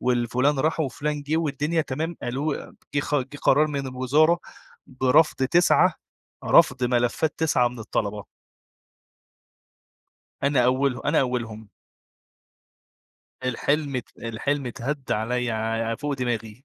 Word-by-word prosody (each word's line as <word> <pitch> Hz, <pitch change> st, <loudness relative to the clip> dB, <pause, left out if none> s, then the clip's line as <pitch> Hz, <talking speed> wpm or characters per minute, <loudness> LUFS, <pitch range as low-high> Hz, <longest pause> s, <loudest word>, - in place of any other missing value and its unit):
والفلان 125 Hz, +3 st, +1 dB
راح 155 Hz, +3 st, +1 dB
وفلان 150 Hz, +1 st, -2 dB
جِه، 150 Hz, +3 st, -1 dB
والدنيا 155 Hz, +1 st, 0 dB
تمام، 160 Hz, +5 st, -4 dB
ألو 140 Hz, +5 st, -3 dB, 0.2 s
جه 145 Hz, -, +3 dB
خ 145 Hz, 0 st, -3 dB
جه 135 Hz, 0 st, -1 dB
قرار 150 Hz, +3 st, +4 dB
من 140 Hz, -2 st, -3 dB
الوزارة 140 Hz, +7 st, +2 dB, 0.5 s
برَفض 130 Hz, +4 st, +3 dB
9 175 Hz, +6 st, +4 dB, 0.5 s
رَفض 125 Hz, -, +4 dB
ملفات 120 Hz, +5 st, +1 dB
9 145 Hz, -6 st, +2 dB
من 120 Hz, 0 st, -11 dB
الطَلَبة. 105 Hz, -1 st, -3 dB, 2.2 s
أنا 140 Hz, -3 st, +3 dB
أوله 130 Hz, 0 st, +1 dB
أنا 150 Hz, +2 st, +3 dB
أولهم. 115 Hz, -4 st, -3 dB, 1.8 s
الحلم 140 Hz, +3 st, 0 dB
ات 125 Hz, -, -5 dB
الحلم 125 Hz, +4 st, -2 dB
اتهد 130 Hz, +3 st, -4 dB
عليَّ 125 Hz, +3 st, -1 dB
ع 115 Hz, +1 st, -1 dB
فوق 145 Hz, +4 st, -3 dB
دماغي. 120 Hz, -2 st, -4 dB
130 Hz, 115 wpm, -24 LUFS, 120-145 Hz, 2.2 s, قرار